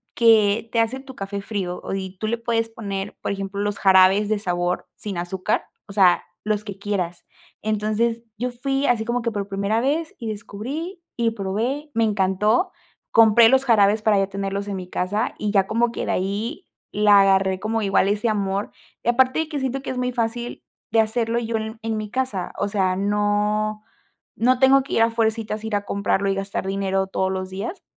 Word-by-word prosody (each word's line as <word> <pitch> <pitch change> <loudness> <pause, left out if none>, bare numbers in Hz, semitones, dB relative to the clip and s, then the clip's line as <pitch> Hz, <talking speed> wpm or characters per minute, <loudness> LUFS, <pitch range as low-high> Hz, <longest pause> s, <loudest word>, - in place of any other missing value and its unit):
que 225 -1 +4
te 230 - +4
hace 245 +4 -1
tu 265 -1 -12
café 200 0 -5
frío 195 -4 -4
y 190 -1 -5
tú 215 - -2
le 235 +2 0
puedes 230 -1 -1
poner, 200 -3 -5
por - - -2
ejemplo, 195 0 -4
los 205 -1 -2
jarabes 190 +2 +5
de 215 -1 +1
sabor 175 -2 -1
sin 200 -4 -5
azúcar, 185 +4 -1 0.2
o 200 - -9
sea, 185 -3 +4 0.2
los 210 -1 0
que 200 -1 -7
quieras, 185 -4 -3 0.4
entonces, 215 +2 0
yo 250 +2 -1
fui 270 +3 -1
así 235 -3 +2
como 240 +1 -1
que 235 - 0
por 200 -1 -3
primera 200 +3 0
vez 315 +5 -1
y 225 -2 -4
descubrí 270 - -6 0.2
y 230 -1 +2
probé, 230 +9 -3
me 225 0 +2
encantó, 210 - +1 0.4
compré 225 0 +7
los 265 0 +3
jarabes 210 -2 +4
para 215 -2 +4
ya 195 - +1
tenerlos 200 0 -3
en 195 - -3
mi 180 -1 -7
casa 200 +4 -1
y 210 -1 -1
ya 195 -2 +3
como 230 +1 +1
que - - -4
de - - 0
ahí 205 - -3 0.3
la 205 -1 +6
agarré 190 -1 +3
como 220 +2 -1
igual 195 0 +3
ese 210 +2 +1
amor 200 -1 -1 0.3
y 240 - +1
aparte 260 +4 +3
de 320 -1 -1
que 295 -3 -3
siento 265 0 -2
que - - -5
es 255 - -5
muy 250 0 0
fácil 235 0 -3 0.3
de 225 0 +5
hacerlo 230 +1 0
yo 230 -1 -2
en 220 0 -4
mi 215 -1 -4
casa, 255 -9 -2
o 200 - +1
sea, 190 -3 +1
no 210 +1 0 0.5
no 250 +2 +2
tengo 270 +1 +6
que 275 - -7
ir 225 - +3
a 230 - +2
fuercitas, 220 -1 -1
ir 215 -2 -1
a 205 - 0
comprarlo 200 0 0
y 195 - +1
gastar 195 -1 -3
dinero 195 0 0
todos 190 0 -1
los 185 0 -3
días, 220 - -5
215 Hz, 200 wpm, -23 LUFS, 195-230 Hz, 0.5 s, compré